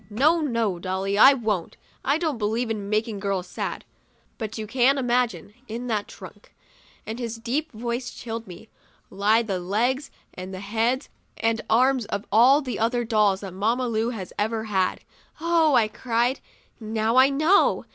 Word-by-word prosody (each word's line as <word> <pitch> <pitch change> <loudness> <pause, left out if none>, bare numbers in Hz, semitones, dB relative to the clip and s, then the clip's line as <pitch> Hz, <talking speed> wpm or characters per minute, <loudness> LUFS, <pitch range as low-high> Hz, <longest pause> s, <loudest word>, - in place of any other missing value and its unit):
" - - -29 0.2
No, 335 +2 +5
no, 230 - -1
Dolly, 190 +2 -2
I 270 +7 +8
won't. 215 -8 -2 0.3
I 280 +3 +2
don't 315 -7 -2
believe 225 +2 -1
in 205 -2 -4
making 215 0 -1
girls 195 -2 -2
sad. 180 - -5 0.5
But 215 -1 -5
you 220 - -4
can 260 +4 +3
imagine! 240 -8 0
In 235 +3 -5
that 210 -2 -1
trunk," - - -13 0.5
and 220 +2 -5
his 235 -2 -4
deep 260 +8 -2
voice 235 +2 -4
chilled 230 -1 -7
me, 180 +4 -11 0.2
" - - -35
lie 210 +4 +3
the 195 -5 -2
legs 235 +10 -1 0.2
and 185 +1 -7
heads 225 +7 -1 0.3
and 225 0 0
arms 255 +1 +3
of 200 -2 -4
all 250 +7 +6
the 240 -1 -1
dolls 210 -4 +2
that 195 -3 -7
Mamma 230 +6 0
Lu 225 0 0
has 200 -7 -6
ever 220 +1 -1
had." 190 -4 0 0.4
'Oh," 325 -3 +3
I 225 -3 +4
cried, 240 +3 -1 0.4
'now 220 +1 -1
I 260 +1 +7
know! 310 +8 +3
225 Hz, 165 wpm, -24 LUFS, 210-250 Hz, 0.5 s, I